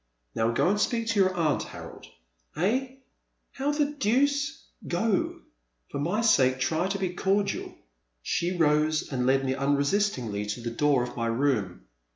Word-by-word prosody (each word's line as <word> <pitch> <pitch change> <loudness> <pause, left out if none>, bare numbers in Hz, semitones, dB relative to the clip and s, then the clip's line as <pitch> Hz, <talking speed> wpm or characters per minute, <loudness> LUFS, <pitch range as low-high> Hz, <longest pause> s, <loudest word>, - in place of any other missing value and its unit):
Now 115 0 +1
go 115 - +1
and 205 +2 +2
speak 230 +1 0
to 225 -3 +1
your 185 -1 +3
aunt, 160 -4 +1
Harold.'* - - -9 0.5
'*Ehl 255 - 0 0.5
How 280 +2 -1
the 295 0 +2
deuce— 285 +2 0 0.2
Go, 220 -4 0 0.5
for - - -3
my 175 +10 0
sake 130 - +3
try 160 +7 0
to 195 +1 -2
be 185 -2 -2
cordial. 195 +2 -1 0.5
She 175 +1 -1
rose 155 -1 +2
and 125 -1 0
led 135 +1 +3
me 130 - 0
unresistingly 140 - 0
to 105 +4 -4
the 115 0 -4
door 140 +1 +2
of 125 - -6
my 115 -1 -1
room. 115 - 0
165 Hz, 160 wpm, -27 LUFS, 130-210 Hz, 0.5 s, your